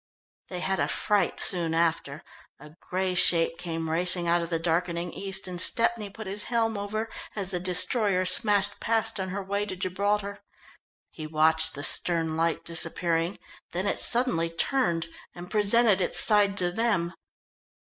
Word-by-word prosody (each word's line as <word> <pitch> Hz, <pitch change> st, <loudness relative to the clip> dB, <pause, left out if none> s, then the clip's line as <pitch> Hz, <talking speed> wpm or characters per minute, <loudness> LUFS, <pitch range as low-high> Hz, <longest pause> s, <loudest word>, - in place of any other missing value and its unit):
They 180 Hz, -1 st, -6 dB
had 190 Hz, +1 st, -2 dB
a -, -, 0 dB
fright 205 Hz, -4 st, -1 dB
soon 170 Hz, -3 st, +3 dB
after. 165 Hz, -3 st, -2 dB, 0.4 s
A 150 Hz, +2 st, -14 dB
grey 185 Hz, 0 st, -3 dB
shape 170 Hz, -1 st, +3 dB
came 165 Hz, -2 st, -5 dB
racing 175 Hz, +2 st, +4 dB
out 170 Hz, +1 st, +1 dB
of 170 Hz, -, -6 dB
the 165 Hz, -, -1 dB
darkening 170 Hz, +1 st, -2 dB
east, 195 Hz, -1 st, -3 dB
and 180 Hz, -2 st, -2 dB
Stepney 230 Hz, -1 st, +2 dB
put 220 Hz, +2 st, -10 dB
his 200 Hz, +2 st, -2 dB
helm 225 Hz, -2 st, -1 dB
over 210 Hz, +2 st, -4 dB, 0.3 s
as 195 Hz, -3 st, -5 dB
the 180 Hz, -, -3 dB
destroyer 185 Hz, +2 st, +3 dB
smashed 205 Hz, +1 st, +3 dB
past 225 Hz, -2 st, -1 dB
on 190 Hz, 0 st, -4 dB
her 195 Hz, +2 st, -5 dB
way 200 Hz, +2 st, -3 dB
to 185 Hz, -, -5 dB
Gibraltar. 200 Hz, +2 st, -2 dB, 0.7 s
He 155 Hz, -1 st, -9 dB
watched 160 Hz, +1 st, +3 dB
the 145 Hz, -, -6 dB
stern 165 Hz, 0 st, -1 dB
light 165 Hz, 0 st, -2 dB
disappearing, 170 Hz, +1 st, -2 dB, 0.4 s
then -, -, -3 dB
it -, -, -2 dB
suddenly 235 Hz, -10 st, +2 dB
turned 170 Hz, -1 st, -1 dB, 0.3 s
and 175 Hz, +1 st, -11 dB
presented 210 Hz, -1 st, +2 dB
its -, -, +1 dB
side 205 Hz, -2 st, +3 dB
to 180 Hz, -2 st, +1 dB
them. 185 Hz, -5 st, -1 dB
185 Hz, 160 wpm, -26 LUFS, 170-205 Hz, 0.7 s, racing